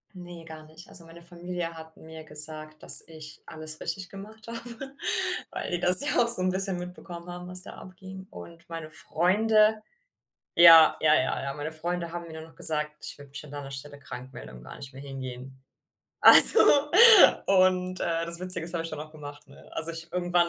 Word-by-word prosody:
Ne, 175 Hz, -2 st, -14 dB
gar 160 Hz, -1 st, -15 dB
nicht. 160 Hz, +3 st, -18 dB
Also, 170 Hz, -, -9 dB
meine 165 Hz, +1 st, -18 dB
Familie 175 Hz, 0 st, -10 dB
hat 160 Hz, 0 st, -16 dB
mir 160 Hz, 0 st, -16 dB
gesagt, 155 Hz, 0 st, 0 dB
dass -, -, +6 dB
ich 155 Hz, -1 st, -15 dB
alles 155 Hz, 0 st, -6 dB
richtig 190 Hz, -2 st, -9 dB
gemacht 215 Hz, +3 st, -16 dB
habe, 235 Hz, +3 st, -12 dB, 0.6 s
weil -, -, -9 dB
die 175 Hz, -, -5 dB
das 180 Hz, +1 st, +6 dB
ja 290 Hz, -, -2 dB
auch -, -, -6 dB
so 235 Hz, -5 st, +7 dB
'n 185 Hz, -, -3 dB
bisschen 190 Hz, -1 st, +3 dB
mitbekommen 175 Hz, -1 st, -13 dB
haben, 180 Hz, 0 st, -12 dB
was 180 Hz, 0 st, +3 dB
da -, -, -7 dB
abging. 190 Hz, 0 st, -16 dB
Und 170 Hz, 0 st, -17 dB
meine 165 Hz, -2 st, -11 dB
Freunde 215 Hz, +7 st, -2 dB, 0.8 s
Ja, 165 Hz, -2 st, +4 dB
ja, 155 Hz, -1 st, 0 dB
ja, 130 Hz, -, -5 dB
ja. 140 Hz, 0 st, -8 dB
Meine 150 Hz, +2 st, -10 dB
Freunde 170 Hz, +1 st, -8 dB
haben 170 Hz, 0 st, -10 dB
mir -, -, -15 dB
dann 160 Hz, 0 st, -13 dB
noch 165 Hz, -, -21 dB
gesagt: 150 Hz, -1 st, +1 dB
„Ich -, -, -9 dB
würde 145 Hz, -1 st, -18 dB
mich 145 Hz, +2 st, -10 dB
an 150 Hz, -, -17 dB
deiner 145 Hz, -1 st, -11 dB
Stelle 145 Hz, +1 st, -12 dB
krankmelden 125 Hz, -, -14 dB
und -, -, -19 dB
gar 65 Hz, -, -15 dB
nicht 135 Hz, 0 st, -14 dB
mehr 135 Hz, +1 st, -15 dB
hingehen.“ 130 Hz, -1 st, -13 dB, 0.6 s
Also, 450 Hz, -, +7 dB, 0.9 s
und, 185 Hz, -1 st, -2 dB
äh, 165 Hz, 0 st, -6 dB
das 170 Hz, +1 st, 0 dB
Witzige 185 Hz, -2 st, +1 dB
ist, 170 Hz, -, -7 dB
habe 165 Hz, -1 st, -6 dB
ich 165 Hz, -, -8 dB
dann -, -, -11 dB
auch 155 Hz, 0 st, -13 dB
gemacht, 145 Hz, -1 st, -15 dB
ne? 140 Hz, -, -21 dB
Also, 160 Hz, -, +2 dB
ich 165 Hz, +1 st, -11 dB
irgendwann 175 Hz, -1 st, -3 dB
165 Hz, 200 wpm, -22 LUFS, 155-180 Hz, 0.9 s, so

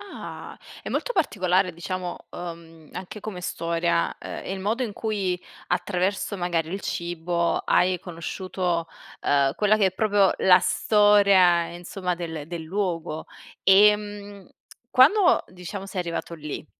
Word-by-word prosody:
Ah. 405 Hz, -1 st, -9 dB, 0.3 s
È -, -, -6 dB
molto -, -, -2 dB
particolare 185 Hz, -, +1 dB
diciamo, 180 Hz, +1 st, -5 dB
uhm, 165 Hz, -2 st, -9 dB
anche 185 Hz, +3 st, -7 dB
come 200 Hz, -3 st, -6 dB
storia, 170 Hz, -1 st, -1 dB
ehm, -, -, -7 dB
il 190 Hz, -, -6 dB
modo 220 Hz, +6 st, -1 dB
in 215 Hz, -, -5 dB
cui 200 Hz, -5 st, -2 dB, 0.3 s
attraverso 195 Hz, +2 st, -1 dB
magari 170 Hz, -3 st, -1 dB
il 195 Hz, -, -3 dB
cibo 170 Hz, 0 st, -1 dB
hai 180 Hz, 0 st, +2 dB
conosciuto, 175 Hz, 0 st, -3 dB, 0.3 s
ehm, 140 Hz, -1 st, +2 dB
quella 210 Hz, 0 st, +3 dB
che 205 Hz, -3 st, +3 dB
è 190 Hz, -, 0 dB
proprio 205 Hz, -1 st, +3 dB
la 180 Hz, -1 st, +6 dB
storia, 200 Hz, -5 st, +4 dB
insomma, 180 Hz, +1 st, -4 dB
del 165 Hz, -4 st, -6 dB
del 170 Hz, 0 st, -6 dB
luogo. 165 Hz, -3 st, -3 dB, 0.4 s
Ehm, 205 Hz, 0 st, +3 dB, 0.4 s
quando 355 Hz, +8 st, +5 dB
diciamo 185 Hz, +2 st, -7 dB
sei 190 Hz, -1 st, -4 dB
arrivato 170 Hz, -1 st, -4 dB
lì, 150 Hz, -2 st, -6 dB
180 Hz, 130 wpm, -25 LUFS, 170-205 Hz, 0.4 s, la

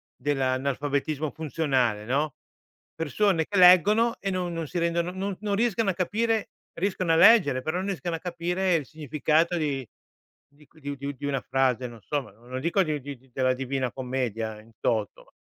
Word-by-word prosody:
dell'analfabetismo 140 Hz, +2 st, -1 dB
funzionale, 135 Hz, -9 st, 0 dB
no, 140 Hz, +4 st, 0 dB, 0.6 s
persone 165 Hz, +2 st, +1 dB
che 205 Hz, -, -2 dB
leggono 200 Hz, +6 st, +6 dB
e 195 Hz, -, -2 dB
non 180 Hz, -2 st, -2 dB
non 165 Hz, -2 st, -3 dB
si 180 Hz, -, -5 dB
rendono 170 Hz, +1 st, 0 dB
non 190 Hz, +1 st, -3 dB
non 205 Hz, -1 st, 0 dB
riescono 225 Hz, -1 st, +1 dB
a -, -, +1 dB
capire, 220 Hz, +4 st, 0 dB, 0.2 s
riescono 185 Hz, -2 st, -1 dB
a -, -, +4 dB
leggere 170 Hz, -, +6 dB
però 175 Hz, +4 st, -1 dB
n 190 Hz, -, -4 dB
riescono 180 Hz, -3 st, -2 dB
a -, -, -5 dB
capire 180 Hz, +1 st, -1 dB
il 155 Hz, -4 st, -1 dB
significato 155 Hz, +3 st, 0 dB
di 140 Hz, -6 st, -2 dB, 0.8 s
qu -, -, -22 dB
di 145 Hz, -1 st, -6 dB
u 140 Hz, -, -3 dB
di 140 Hz, 0 st, -9 dB
u -, -, -1 dB
di 145 Hz, +1 st, -8 dB
una 140 Hz, -2 st, -1 dB
frase, 130 Hz, -1 st, +1 dB
non 115 Hz, -2 st, -12 dB
so, 145 Hz, +8 st, -2 dB
ma 130 Hz, -, -14 dB
non 115 Hz, +5 st, -20 dB
lo 130 Hz, -, -2 dB
dico 170 Hz, +7 st, +2 dB
di 155 Hz, -3 st, -2 dB
di 140 Hz, 0 st, -7 dB
di 130 Hz, +1 st, -26 dB
della 130 Hz, 0 st, +2 dB
Divina 130 Hz, -1 st, -2 dB
Commedia 120 Hz, -4 st, -3 dB
in 115 Hz, +1 st, -20 dB
toto. 110 Hz, -3 st, -2 dB
155 Hz, 190 wpm, -26 LUFS, 130-180 Hz, 0.8 s, leggono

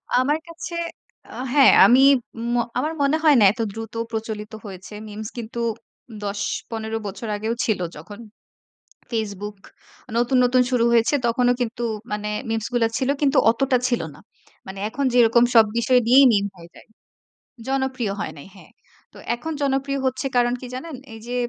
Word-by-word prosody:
আমার 280 Hz, +5 st, +2 dB
কাছে 335 Hz, +1 st, -8 dB, 0.6 s
আ -, -, -12 dB, 0.2 s
হ্যাঁ, 280 Hz, -2 st, +7 dB
আমি 245 Hz, +6 st, +6 dB, 0.5 s
ম -, -, +1 dB, 0.2 s
আমার 305 Hz, +5 st, -1 dB
মনে 280 Hz, +2 st, +3 dB
হয় 305 Hz, -3 st, +6 dB
না 210 Hz, -, +5 dB
এত 230 Hz, -, -12 dB
দ্রুত 225 Hz, 0 st, -7 dB, 0.2 s
প্রচলিত 220 Hz, -1 st, -5 dB
হয়েছে। 190 Hz, +1 st, -10 dB
মিমস 215 Hz, +1 st, -7 dB
কিন্তু 235 Hz, 0 st, -6 dB, 0.6 s
১০-১৫ 220 Hz, +2 st, -3 dB
বছর 200 Hz, +3 st, -7 dB
আগেও 220 Hz, +3 st, -2 dB
ছিল 215 Hz, -4 st, 0 dB, 0.2 s
যখন 205 Hz, +8 st, -11 dB, 0.9 s
Facebook 210 Hz, -2 st, -4 dB, 0.6 s
নতুন, 245 Hz, +2 st, +2 dB
নতুন 250 Hz, +1 st, +4 dB
শুরু 245 Hz, -2 st, +2 dB
হয়েছে 230 Hz, +3 st, +3 dB
তখনও 245 Hz, +1 st, +2 dB
কিন্তু 240 Hz, 0 st, -3 dB, 0.3 s
মানে 210 Hz, 0 st, -3 dB, 0.2 s
মিমস 225 Hz, -1 st, -2 dB
গুলা 230 Hz, -2 st, +3 dB
ছিল 260 Hz, +1 st, -1 dB
কিন্তু 280 Hz, 0 st, +2 dB
অতটা 255 Hz, +2 st, +2 dB
ছিল 240 Hz, -2 st, 0 dB
না। -, -, -16 dB, 0.5 s
মানে 190 Hz, +1 st, -8 dB
এখন 280 Hz, +5 st, -2 dB
যেরকম 235 Hz, -1 st, +5 dB
সব 225 Hz, -1 st, +8 dB
বিষয় 250 Hz, +2 st, +4 dB
নিয়েই 265 Hz, +3 st, +7 dB
মিম 200 Hz, -1 st, +2 dB
হয়ে 170 Hz, -1 st, -14 dB
যায়। -, -, -16 dB, 0.8 s
জনপ্রিয় 265 Hz, -5 st, -1 dB
হয় -, -, -4 dB
নাই। 140 Hz, -, -11 dB
হ্যাঁ। 190 Hz, -, -16 dB, 0.4 s
তো -, -, -18 dB, 0.2 s
এখন 320 Hz, +7 st, -5 dB
জনপ্রিয় 275 Hz, 0 st, 0 dB
হচ্ছে 260 Hz, +2 st, -2 dB
কারণ 240 Hz, 0 st, +3 dB
কি 255 Hz, -, -8 dB
জানেন? 310 Hz, +4 st, -6 dB, 0.2 s
এইযে 235 Hz, +3 st, -7 dB
235 Hz, 160 wpm, -22 LUFS, 215-260 Hz, 0.9 s, সব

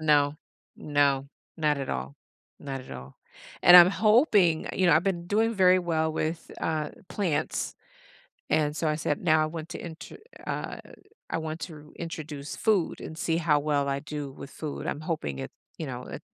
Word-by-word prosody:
No 145 Hz, -2 st, +3 dB, 0.4 s
no, 140 Hz, -2 st, +1 dB, 0.3 s
not 150 Hz, -2 st, +2 dB
at 135 Hz, -, -3 dB
all 65 Hz, +2 st, -4 dB, 0.4 s
not 135 Hz, -2 st, -5 dB
at 130 Hz, -, -13 dB
all, 65 Hz, +1 st, -9 dB, 0.5 s
and 175 Hz, -, +10 dB
I'm 175 Hz, 0 st, +10 dB
hoping 210 Hz, -, +4 dB
you 185 Hz, -, +2 dB
know, 165 Hz, -, +6 dB
I've 160 Hz, -, +3 dB
been 175 Hz, -3 st, -1 dB
doing 225 Hz, +4 st, +2 dB
very 185 Hz, -2 st, +5 dB
well 160 Hz, -3 st, 0 dB
with, 160 Hz, +1 st, -3 dB
uh, 155 Hz, -2 st, -1 dB, 0.2 s
plants, 180 Hz, -6 st, -1 dB, 0.8 s
and 150 Hz, -1 st, +2 dB
so 160 Hz, -, 0 dB
I 150 Hz, -, +1 dB
said, 150 Hz, -2 st, -1 dB
“Now 155 Hz, -2 st, +4 dB
I -, -, +1 dB
want 160 Hz, 0 st, -6 dB
to -, -, -5 dB
enter 165 Hz, -1 st, -9 dB, 0.3 s
“uh, -, -, -4 dB, 0.5 s
“I -, -, -1 dB
want 160 Hz, 0 st, -5 dB
to 150 Hz, -3 st, -9 dB
introduce 155 Hz, -3 st, -6 dB
food 205 Hz, -6 st, +1 dB
and 160 Hz, -, -7 dB
see 165 Hz, -1 st, 0 dB
how 155 Hz, -3 st, +3 dB
well 145 Hz, -1 st, 0 dB
I 140 Hz, 0 st, -1 dB
do 145 Hz, -2 st, -6 dB
with 135 Hz, -, -10 dB
food.” 150 Hz, -3 st, -6 dB
I'm 150 Hz, -, -3 dB
hoping 150 Hz, -, -3 dB
it 65 Hz, -, -6 dB, 0.3 s
you -, -, -4 dB
know, -, -, -6 dB
that -, -, -7 dB
155 Hz, 185 wpm, -27 LUFS, 145-170 Hz, 0.8 s, and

